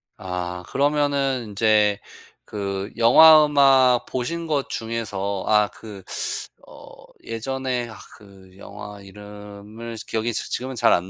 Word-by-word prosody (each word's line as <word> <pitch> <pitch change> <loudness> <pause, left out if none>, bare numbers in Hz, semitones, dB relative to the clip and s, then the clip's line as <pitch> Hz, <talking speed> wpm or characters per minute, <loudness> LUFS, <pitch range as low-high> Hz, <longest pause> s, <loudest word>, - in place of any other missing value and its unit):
아. 90 -1 -5
그러면은 140 -4 0
인제 105 -1 +2 0.5
그 100 -1 -4
영화 155 +7 +8
음악 135 -4 +4
보신 165 +7 -4
것 145 -3 -1
중에서 100 -4 -4
아 105 -1 +4
그 105 -4 -12 0.7
어 - - -14 0.3
예전에 125 +1 -3
아 110 - -11 0.2
그 95 -2 -18
영화 105 0 -10
이름을 105 +3 -11
기억이 115 +1 -2
지 - - -4
지금은 130 +1 -4
잘 - - +4
안 90 +2 -1
110 Hz, 215 characters per minute, -22 LUFS, 100-130 Hz, 0.7 s, 영화